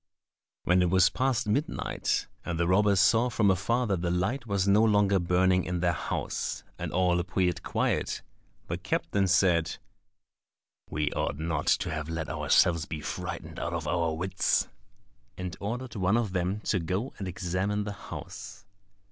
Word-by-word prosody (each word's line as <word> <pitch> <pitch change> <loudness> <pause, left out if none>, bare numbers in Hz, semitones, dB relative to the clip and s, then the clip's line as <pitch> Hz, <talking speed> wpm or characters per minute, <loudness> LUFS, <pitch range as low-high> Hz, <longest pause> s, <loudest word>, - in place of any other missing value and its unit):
When 90 +1 +3
it 90 - +2
was 95 +2 +5
past 130 -4 0
midnight, 135 +9 -1 0.2
and 85 -1 -3
the 85 - +2
robbers 100 +1 +4
saw 120 +4 +4
from 105 -4 +3
afar 115 +7 +1
that 95 -6 -1
the 85 - 0
light 100 +9 -1
was 100 -2 0
no 100 +3 +5
longer 105 -3 +4
burning 90 +1 +3
in 90 -1 -2
their 85 0 +2
house, - - -3 0.2
and - - -4
all 90 -1 +2
appeared 90 0 0
quiet, - - -1 0.4
the - - -4
captain 100 -1 0
said, 85 -3 +3 1.1
"We 75 -1 -1
ought - - -2
not 80 +1 -2
to - - +2
have 75 0 -4
let 80 -2 -3
ourselves 85 -3 +3
be 80 - -4
frightened - - -5
out - - -3
of - - -3
our 85 -2 0
wits;" 95 +3 +1 0.7
and 90 -2 -5
ordered 120 +4 -4
one 100 +2 +2
of 110 -5 -1
them 95 +3 -1
to 100 - 0
go 95 +9 -2
and 95 - -4
examine 95 +3 -1
the 105 0 -4 0.2
house. - - -8
95 Hz, 165 wpm, -28 LUFS, 85-105 Hz, 1.1 s, was